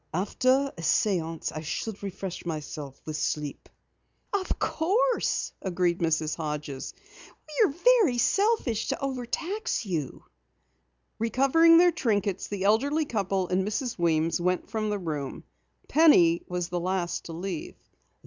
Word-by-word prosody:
After 255 +9 +1
a 170 - -8
séance 165 -2 0
I 155 - -4
should 200 +6 -4
refresh 190 -2 -5
myself 150 -4 -6
with 155 -1 -4
sleep." 150 -2 -3 0.6
"Of 390 -2 -1
course," 460 +10 0
agreed 180 -2 0
Mrs. 160 -2 0
Hodges. 150 -4 -5 0.5
"We 310 +8 +2 0.4
are 245 - -3
selfish 390 - +1
to - - -2
overtax 275 - -3
you." 160 -8 -4 1.0
Recovering 275 +9 +5
their 350 +1 +6
trinkets, 205 - -1
the 200 -2 -4
elderly 280 +10 +2
couple 195 -6 -1
and 185 +1 +1
Mrs. 220 +2 -3
Weems 165 0 +1
went 180 +2 -1
from 215 -1 -1
the 210 - 0
room. 150 -7 -5 0.4
Penny 185 - +5
was 180 -1 -3
the 175 -1 -2
last 180 0 -2
to 165 - -7
leave. 175 -1 -5
190 Hz, 130 wpm, -27 LUFS, 165-260 Hz, 1.0 s, their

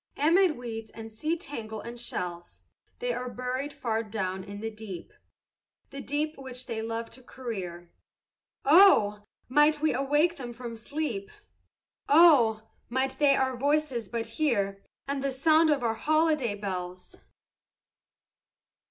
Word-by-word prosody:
Amid 330 +1 +4
weeds 225 -2 -6
and 225 0 -10
sea 310 +10 -2
tangle 225 - -7
and 235 +2 -8
shells 175 -7 -5 0.4
They - - -2
are 250 - -4
buried 255 +4 -3
far 225 -5 -2
down 190 -4 -3
in 200 +1 -8
the 225 +1 -4
deep, 210 -5 -9 0.8
The 275 0 -6
deep 300 +3 -2
which 255 -1 -8
they 225 -2 -4
loved 230 +1 -4
to 255 - -12
career. 190 -10 -7 0.7
Oh, 275 - +6 0.3
might 295 +3 +4
we 310 +1 +2
awake 295 +6 +2
them 245 -3 -6
from 235 -1 -7
sleep! 310 - -4 0.8
Oh, 255 -9 +6 0.2
might 260 +2 -1
they 285 -2 +5
our 260 -1 0
voices 280 -2 0
but 230 -1 -2
hear, 225 -6 -1 0.3
And 275 -1 -2
the 275 - +1
sound 315 +4 +4
of 285 -4 +2
our 230 -1 +1
holiday 305 -3 +1
bells! 185 -3 -6
250 Hz, 135 wpm, -28 LUFS, 220-295 Hz, 0.8 s, Oh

